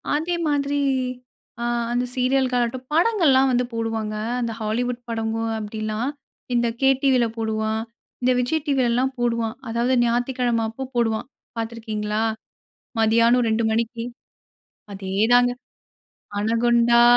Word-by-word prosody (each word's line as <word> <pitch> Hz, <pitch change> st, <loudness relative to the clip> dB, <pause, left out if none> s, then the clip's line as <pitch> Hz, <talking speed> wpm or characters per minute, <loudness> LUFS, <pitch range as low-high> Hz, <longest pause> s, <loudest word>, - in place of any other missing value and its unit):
அதே 330 Hz, +4 st, 0 dB
மாதிரி 285 Hz, 0 st, 0 dB, 0.8 s
ஆ -, -, -1 dB, 0.3 s
அந்த 245 Hz, +1 st, +1 dB
சீரியல் 260 Hz, +1 st, +2 dB
ஆகட்டும், 245 Hz, +1 st, -1 dB
படங்கள்லாம் 320 Hz, -8 st, +4 dB
வந்து 250 Hz, 0 st, +2 dB
போடுவாங்க. 225 Hz, -2 st, -2 dB, 0.3 s
அந்த 235 Hz, -1 st, -1 dB
ஹாலிவுட் 240 Hz, +3 st, -1 dB
படமும் 225 Hz, 0 st, -1 dB
அப்படிலாம். 215 Hz, +3 st, -3 dB, 0.4 s
இந்த 240 Hz, 0 st, +2 dB
KTvல 270 Hz, -2 st, +4 dB
போடுவான். 220 Hz, 0 st, -1 dB, 0.4 s
இந்த 250 Hz, +1 st, +3 dB
Vijay 250 Hz, +6 st, +1 dB
Tvல 270 Hz, -3 st, +2 dB
எல்லாம் 255 Hz, +3 st, +1 dB
போடுவான். 230 Hz, -1 st, 0 dB
அதாவது 235 Hz, +3 st, +1 dB
ஞாயித்துக்கிழமை 240 Hz, 0 st, +1 dB
அப்ப 260 Hz, +4 st, -6 dB
போடுவான். 230 Hz, 0 st, 0 dB, 0.3 s
பார்த்து 225 Hz, 0 st, -3 dB
இருக்கிறீங்களா? 215 Hz, -1 st, -2 dB, 0.8 s
மதியானம் 230 Hz, +2 st, +4 dB
2:00 220 Hz, +1 st, +1 dB
மணிக்கு. 230 Hz, +1 st, -1 dB, 0.9 s
அதேதாங்க. 215 Hz, +6 st, +3 dB, 0.9 s
"அனகுண்டா, 235 Hz, +2 st, +4 dB
235 Hz, 110 wpm, -23 LUFS, 225-255 Hz, 0.9 s, படங்கள்லாம்